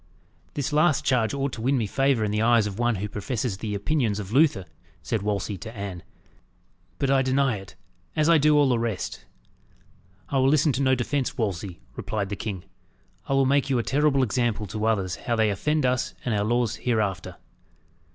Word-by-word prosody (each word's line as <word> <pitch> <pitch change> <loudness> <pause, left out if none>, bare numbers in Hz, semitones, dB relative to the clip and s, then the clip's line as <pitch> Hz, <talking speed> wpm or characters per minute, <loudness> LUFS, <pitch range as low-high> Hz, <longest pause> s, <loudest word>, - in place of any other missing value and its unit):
"This 145 0 -2
last 155 +1 +3
charge 120 -4 +2
ought 140 -1 -2
to 115 - -6
win 135 +4 +2
me 115 - 0
favour 135 +2 +1
in 105 - -1
the 105 +1 0
eyes 115 -1 +4
of 105 +1 -5
one 120 -1 +2
who 100 +2 -3
professes 105 +1 -3
the 105 -1 -3
Opinions 110 0 0
of 100 -2 -6
Luther," 135 - +3 0.4
said 115 -4 -1
Wolsey 100 -1 -2
to 110 +5 -9
Anne. 100 -3 -5 1.0
"But 135 -1 0
I 135 -1 +4
deny 130 -2 +1
it, 95 -1 -12 0.4
as 155 -1 +2
I 165 -1 +6
do 150 +1 +4
all 145 -2 +4
the 120 -2 +2
rest." 115 -5 -3 1.0
"I 135 - +1
will 130 +1 +4
listen 150 +1 +3
to 130 +1 -2
no 130 -1 +3
defence, 130 +2 -2
Wolsey," 95 - -3
replied 100 -3 -3
the 100 - -3
king. 100 -4 -5 0.6
"I - - 0
will 135 0 +3
make 140 +1 +2
you 130 - +2
a 120 - 0
terrible 140 0 +2
example 120 -3 0
to 105 +2 -4
others 95 -5 0
how 120 - -2
they 110 -2 +2
offend 150 +8 0
us 125 -1 0
and 120 - 0
our 100 -1 +1
laws 120 0 0
hereafter." 110 -6 -1
120 Hz, 200 wpm, -25 LUFS, 105-135 Hz, 1.0 s, I